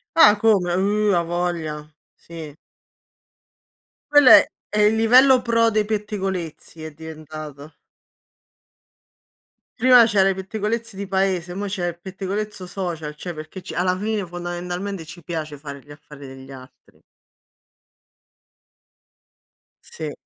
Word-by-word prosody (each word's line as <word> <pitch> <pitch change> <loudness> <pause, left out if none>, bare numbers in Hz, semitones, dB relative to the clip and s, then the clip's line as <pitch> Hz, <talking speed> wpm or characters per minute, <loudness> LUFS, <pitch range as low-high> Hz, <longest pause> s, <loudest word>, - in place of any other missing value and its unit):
Ah, 215 -10 +7
come? 205 -5 +3
Oh, 205 +1 +1
a 170 - +2
voglia, 165 -3 -3 0.2
sì. 160 -3 -10 1.6
Quello 290 -4 +7
è - - +9 0.2
è 210 - -2
il 210 +1 +4
livello 255 +3 +6
pro 230 -1 +2
dei 215 -1 0
pettegolezzi 195 -7 -4
è 160 - -7
diventato. 155 -1 -10 2.1
Prima 250 -1 +7
c'era 195 -3 +3
i 190 - -1
pettegolezzi 215 +3 -4
di 200 0 -6
paese, 185 -2 -1
mo' 205 +1 -4
c'è 190 -3 -3
il 170 0 -6
pettegolezzo 195 +1 -5
social, 170 -5 -5
cioè 175 +3 -7
perché 155 +4 -9
ce - - -8
alla 180 +1 0
fine 210 0 -2
fondamentalmente 175 +1 -5
ci 175 +1 -12
piace 155 -3 -5
fare 140 -1 -9
gli - - -25
affari 145 -1 -13
degli 135 0 -12
altri. 130 -1 -15 2.8
Sì. 155 -2 -7
180 Hz, 120 wpm, -22 LUFS, 160-210 Hz, 2.8 s, è